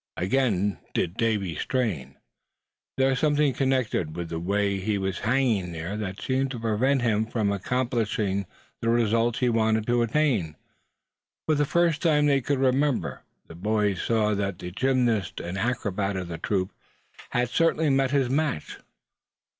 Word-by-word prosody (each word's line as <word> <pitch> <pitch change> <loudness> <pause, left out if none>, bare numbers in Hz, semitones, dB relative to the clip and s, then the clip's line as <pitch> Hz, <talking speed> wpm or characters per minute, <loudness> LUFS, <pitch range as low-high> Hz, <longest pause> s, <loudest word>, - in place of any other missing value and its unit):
Again 100 -1 +1 0.2
did 85 - 0
Davy 105 -7 0
strain. 95 - -2 0.8
There 135 0 +3
was 130 - 0
something 145 -2 +2
connected 130 - 0
with 85 -1 -5
the 80 - -3
way 100 +2 0
he 100 +2 -1
was 95 0 -2
hanging 110 -7 +1
there 80 +5 -4
that 100 -2 -4
seemed 135 0 0
to 125 -3 -5
prevent 120 +4 +1
him 110 -2 +1
from 110 -3 0
accomplishing 105 -3 -1 0.3
the 115 - 0
result 115 0 +2
he 125 -2 +1
wanted 110 -1 +2
to 120 0 +2
attain. 115 - +1 0.9
For 155 - +2
the 145 0 +2
first 165 +1 +2
time 150 -4 +3
they 140 -2 +3
could 140 +3 0
remember 135 +1 +1 0.2
the - - -12
boys 105 +1 0
saw 110 -2 +1
that 100 -2 -2
the 90 - -7
gymnast 120 -3 0
and 85 +2 -5
acrobat 100 -3 -1
of 90 -2 -5
the 80 - -5
troop 95 -1 -1 0.6
had 125 0 0
certainly 160 +2 +2
met 135 -1 +2
his 135 -2 +2
match. 140 - -1
115 Hz, 155 wpm, -26 LUFS, 100-130 Hz, 0.9 s, There